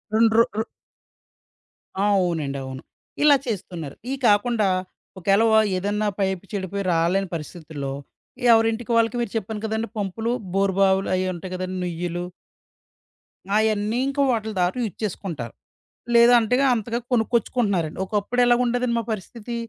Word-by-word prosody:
2 225 0 +4
రొ 230 - +8 0.2
ర్ - - +1 1.4
అవునండి. 170 -8 +1
అవును. 130 0 -7 0.4
ఇలా 295 -1 +7
చేస్తున్నారు. 175 - -5
ఇయి 270 - -2
కాకుండా 215 +1 +3 0.5
ఒకేలా 195 +5 +3 0.3
ఏదన్నా 205 +3 -1
పైపు 190 -2 0
చెడిపోయి 200 0 -3
రాలేని 175 +4 +1
పరిస్థితుల్లో 150 -3 -6 0.6
ఎవరింటికి 225 +1 +2
వాళ్ళకి 230 0 +2
మీరు 235 -4 -3
చెప్పాను 215 0 -5
కదండీ 220 +1 -2
పంపులు, 215 +3 -2 0.2
బోరు 195 0 +2
బావులు 190 0 +3
అయి 185 0 0
ఉంటాయి 180 +1 -8
గదండీ! 185 0 -4
నుయ్యులు. 175 0 -3 1.3
ఆయన్నీ 215 +1 +1
ఇంకా 275 +1 0
వాటిల 220 -2 -1
ద్వారా 180 +1 +1
యూజ్ 210 -6 -4
చేసుకుంటారు. 165 - -4 0.6
లేదంటేగా 240 +2 +5
అంతగా 230 +1 -2
కొనుక్కొచ్చుకుంటున్నారండి. 220 -8 0
ఒకప్పుడు 210 +5 0
ఎలా 240 0 +5
ఉండేదండి 245 0 0
మా - - -3
పరిస్థితి 225 +3 -7
205 Hz, 125 wpm, -23 LUFS, 180-230 Hz, 1.4 s, రొ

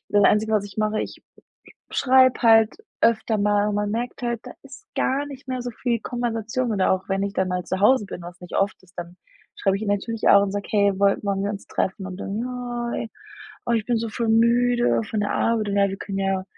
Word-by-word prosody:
das 205 -1 +3
einzige, 220 +1 +3
was 210 -2 +2
ich 200 - -11
mache, 215 0 +1
ich - - -8 0.7
schreibe 260 -1 +4
halt 225 -2 +5 0.3
öfter 220 -1 +2
mal, 205 0 +2
und 210 - -1
man 205 0 -1
merkt 240 +3 -4
halt, 235 -2 -1
da - - -8
ist 275 -1 -13
gar 275 +2 0
nicht 275 -1 -10
mehr 255 -1 -2
so 245 - -4
viel 235 0 -2
Konversation. 240 0 -2
Oder 195 -3 +2
auch 190 0 -2
wenn 195 0 0
ich 200 0 -3
dann 190 -2 0
mal 180 -1 -2
zu 190 - -2
Hause 215 +2 +5
bin, 180 - -8
was 175 0 -10
nicht 180 - -6
oft 200 +1 0
ist, 180 -1 -23
dann 175 0 -7 0.4
schreibe 195 -1 +1
ich 200 - -6
ihr 215 - -3
natürlich 215 +3 0
auch 200 - +7
und 200 -1 -2
sage: 205 0 -3
„Hey, 200 -1 +3
woll 200 0 +3
wollen 200 -1 -1
wir 200 - -1
uns 200 -1 -7
treffen?“ 190 0 -2
Und 185 -1 -7
dann: 200 +2 -4
„Ja, 245 -1 -4 0.7
oh, 240 - +1
ich 225 -2 +1
bin 240 - +1
so 230 0 -3
voll 230 +1 -2
müde 240 +2 +3
von 215 - -1
der 205 - -1
Arbeit 225 -2 +1
und 200 - -1
ja 200 0 +4
wir 195 - -4
können 195 -1 -5
ja 195 -1 0
215 Hz, 240 wpm, -23 LUFS, 200-240 Hz, 0.7 s, auch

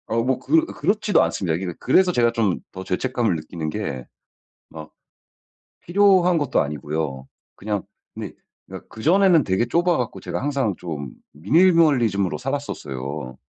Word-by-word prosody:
어 115 +1 0
뭐 130 +1 0
그 325 - +2
그렇지도 205 - +1
않습니다. 85 0 -1
이게 90 0 -4
그래서 180 +8 +3
제가 120 -7 +2
좀 110 -6 0
더 95 - -8
죄책감을 115 +1 -1
느끼는 80 0 -5
게 70 - -4 0.6
막 80 -1 -10 0.9
필요한 185 -1 +4
것도 145 -4 +1
아니고요. 75 -2 -4 0.3
그냥 105 -1 -3 0.3
근데 - - -7 0.3
그니까 - - -10
그전에는 170 - +3
되게 95 +3 0
좁아 170 +8 +1
갖고 125 -3 -3
제가 - - -4
항상 135 -8 -1
좀 75 -6 -6 0.2
미니멀리즘으로 125 - +3
살았었어요. 70 - -5
110 Hz, 320 characters per minute, -22 LUFS, -, 0.9 s, 필요한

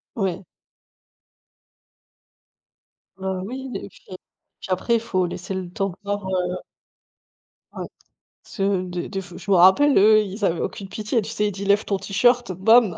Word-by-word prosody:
Ouais. 190 -3 -2 2.7
Bah, 190 -1 -3
oui 260 +6 -6
les - - -5
et - - -11
puis - - -20 0.6
puis - - -10
après 185 +6 +1
il - - +2
faut 185 -5 0
laisser 180 +2 -5
le 185 -2 -4
temps 195 0 -1
de 175 - -10
voir, 205 0 -3
heu 180 -1 -1 1.1
Ouais. - - -5 0.6
Ce 195 - -5
de 185 -3 -1
des 195 -1 -4
f 180 -2 -12
je 185 +2 -10
m'en 190 - +6
rappelle, 190 +12 +6
eux, 215 +2 +7
ils 205 +1 -6
avaient 170 -2 +1
aucune 195 - -4
pitié, 215 +4 -1
tu 210 - -7
sais? 210 -2 0
Il - - -1
dit: 200 +1 -6
«Lève 200 +2 +3
ton 200 - 0
T-shirt, 240 +4 +2
bam!». 200 0 +4
195 Hz, 170 wpm, -23 LUFS, 185-215 Hz, 2.7 s, eux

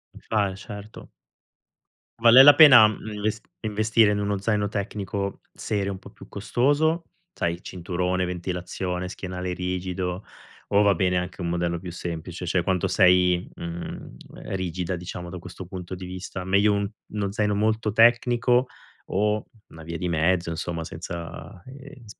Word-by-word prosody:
A - - -11
fa 105 -3 0
eh - - -8
certo. 105 +1 -10 1.1
Vale 120 +3 +9
la 145 +1 +10
pena 130 -8 +9 0.3
inves 105 +1 -2 0.2
investire 110 0 +2
in 105 - 0
uno 100 0 -1
zaino 105 +1 0
tecnico 100 -1 -4
serio, 100 -2 -2
un 95 - -5
po' - - -14
più - - -14
costoso, 145 - +1 0.3
sai 85 - -1
il 85 - -10
cinturone, 90 +1 -2
ventilazione, 90 0 -4
schienale 90 -1 -5
rigido, 90 +1 -3 0.4
o 100 +1 +3
va 100 - +5
bene 90 0 +1
anche 90 +1 -4
un 85 - -2
modello 85 0 -1
più 90 0 -7
semplice, 85 +1 -6
cioè 90 +1 +1
quanto 95 +1 0
sei, 90 -1 +3
mhmm, 85 0 -7 0.4
rigida 90 -1 -3
diciamo 90 0 -7
da 90 - -7
questo 90 +2 -9
punto 90 0 -7
di 90 - -8
vista? 90 0 -6
Meglio 100 +3 +3
un 100 0 0 0.3
uno 100 -2 -2
zaino 105 0 0
molto 110 +1 0
tecnico 120 +2 +4 0.4
o 105 +2 0 0.2
una 80 - -13
via 85 +1 -5
di 90 - -3
mezzo 85 +1 +1
insomma 80 +1 -4
senza, 85 +1 -8
ehm, 135 -1 -12
95 Hz, 155 wpm, -25 LUFS, 90-105 Hz, 1.1 s, la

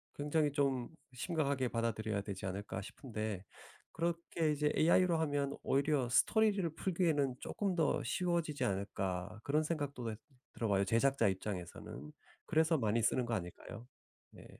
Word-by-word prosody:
굉장히 150 +1 +1
좀 135 -4 0 0.2
심각하게 140 -2 0
받아들여야 110 -3 -1
되지 100 -1 -6
않을까 95 0 -4
싶은데 110 -3 -5 0.5
그렇게 170 -1 0
이제 150 0 +1
AI로 170 +1 +4
하면 145 -3 0
오히려 140 -2 +2
스토리를 200 - +3
풀기에는 160 -9 +1
쪼끔 195 -3 -2
더 160 -3 +2
쉬워지지 170 -6 0
않을까 95 -1 -2
그런 150 +2 +2
생각도 145 -5 -3
왜 110 -2 -3 0.4
들어봐요 100 -4 +1
제작자 115 +1 +3
입장에서는. 95 - -5 0.3
그래서 160 0 +3
많이 115 -2 +1
쓰는 125 +2 +2
거 120 - -2
아닐까요? 100 +5 -7 0.4
네. - - -14
135 Hz, 340 characters per minute, -35 LUFS, 110-160 Hz, 0.5 s, AI로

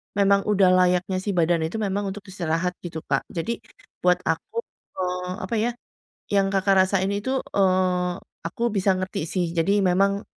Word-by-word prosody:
Memang 200 0 +3
udah 195 -3 +4
layaknya 185 +1 +3
sih 195 0 -3
badan 165 -1 +2
itu 170 - -8
memang 200 0 -1
untuk 195 +1 -6
istirahat 170 0 -1
gitu 160 -2 -6
Kak. 135 - -1
Jadi 220 +8 -3 0.4
buat 180 0 +2
aku 465 +1 -2 0.3
eee, 180 0 -2
apa 210 +5 -2
ya, 240 +2 +1 0.6
yang 195 -1 +3
Kakak 195 0 +2
rasain 195 0 0
itu, 260 +7 -1 0.2
eee, 185 -2 +2 0.3
aku 230 +5 -2
bisa 195 -1 +2
ngerti 185 -4 -3
sih. 180 -2 0
Jadi 195 +5 +2
memang 195 +2 +2
185 Hz, 160 wpm, -24 LUFS, 180-200 Hz, 0.6 s, udah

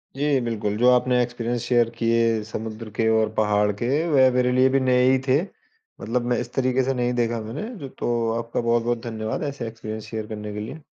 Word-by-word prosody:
जी 145 -1 +1
बिल्कुल, 105 -3 -2
जो 125 +2 +5
आपने 125 0 +3
एक्सपीरियंस 120 0 -3
शेयर 120 -2 +2
किए 115 -1 +2
समुद्र 110 0 -6
के 110 -1 +1
और 110 -1 +2
पहाड़ 105 -1 +2
के, 120 - 0 0.2
वह 130 -4 +5
मेरे 125 0 +2
लिए 130 +1 +4
भी - - +5
नए 125 -1 +3
ही 130 - +3
थे। 135 +3 +4 0.6
मतलब 120 +2 -1
मैं 120 - +2
इस 120 0 -8
तरीक़े 130 0 +1
से 135 +1 0
नहीं 125 0 0
देखा 120 -1 0
मैंने। 145 - -6
तो 115 -2 -1
आपका 115 +1 -3
बहुत-बहुत 120 0 0
धन्यवाद 110 +4 -3
ऐसे 120 -5 -6
एक्सपीरियंस 110 -1 -7
शेयर 110 -1 -5
करने 105 -1 -6
के 105 - -5
लिए। 125 +9 -7
120 Hz, 205 wpm, -23 LUFS, 110-125 Hz, 0.6 s, जो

